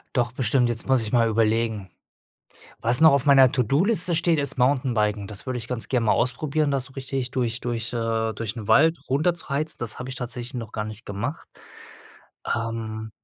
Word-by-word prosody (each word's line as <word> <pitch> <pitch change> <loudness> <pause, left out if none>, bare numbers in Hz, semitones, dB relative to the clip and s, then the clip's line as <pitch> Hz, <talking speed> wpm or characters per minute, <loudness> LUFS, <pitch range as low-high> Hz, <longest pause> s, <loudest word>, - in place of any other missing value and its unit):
Doch 120 -1 0
bestimmt, 125 0 +1
jetzt 115 -1 -2
muss 130 -3 +3
ich 110 - -4
mal 115 -2 +3
überlegen. 110 -2 0 0.9
Was 120 +4 +6
noch 160 - +8
auf 140 0 +1
meiner 135 -3 +6
To-do-Liste 170 - +2
steht, 165 0 +2
ist 140 -1 +1
Mountainbiken. 120 -6 0
Das 100 -1 -8
würde 130 -1 -3
ich 115 0 -8
ganz 125 -3 -2
gern 125 -3 0
mal 110 - +3
ausprobieren, 145 +5 0
das 135 -2 -1
so 135 - -17
richtig 130 -1 -4
durch 120 -2 -2
durch, 115 -2 -4
äh 115 -1 -1
durch 110 +1 -6
'n 110 -3 -7
Wald 160 +7 +4
runter 155 +6 +2
zu 170 - -7
heizen. 150 +3 -1
Das 120 -2 -2
habe 125 - -7
ich 130 - -5
tatsächlich 125 +1 -5
noch 115 -3 -6
gar 105 - -3
nicht 110 +2 -9
gemacht. 115 +9 -5 1.0
Ähm, 110 -1 -4
120 Hz, 195 wpm, -24 LUFS, 115-135 Hz, 1.0 s, noch